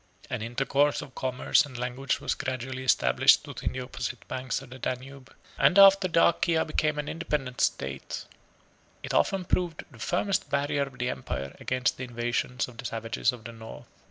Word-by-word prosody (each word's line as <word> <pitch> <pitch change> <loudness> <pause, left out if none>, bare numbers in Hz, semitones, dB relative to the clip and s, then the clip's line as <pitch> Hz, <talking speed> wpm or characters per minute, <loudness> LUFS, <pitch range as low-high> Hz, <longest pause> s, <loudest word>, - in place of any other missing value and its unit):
An - - -2
intercourse 135 +5 +1
of 130 - -12
commerce 130 -1 +2
and 135 -4 -9
language 125 +2 -2
was - - -1
gradually 130 0 -4
established 130 - +5
between - - -4
the 130 - -4
opposite 125 -1 -5
banks 130 -1 -2
of 135 -2 -13
the 130 - -9
Danube; 130 +2 -5 0.3
and 140 +7 +5
after 195 -1 +8
Dacia 165 -1 +3
became 155 -1 0
an 150 0 -3
independent 150 -6 -2
state, 70 0 -2 0.8
it - - -4
often 190 -2 +2
proved 175 -2 -1
the 120 - -15
firmest 185 - 0
barrier 140 0 0
of 130 -2 -13
the 125 +1 -1
empire 70 +1 -5
against 125 -1 0
the 130 - -5
invasions 120 0 -2
of 120 -2 -14
the 130 - -6
savages 115 +2 0
of 120 -3 -11
the 115 - -7
North. 110 0 -10
130 Hz, 175 wpm, -28 LUFS, 125-150 Hz, 0.8 s, after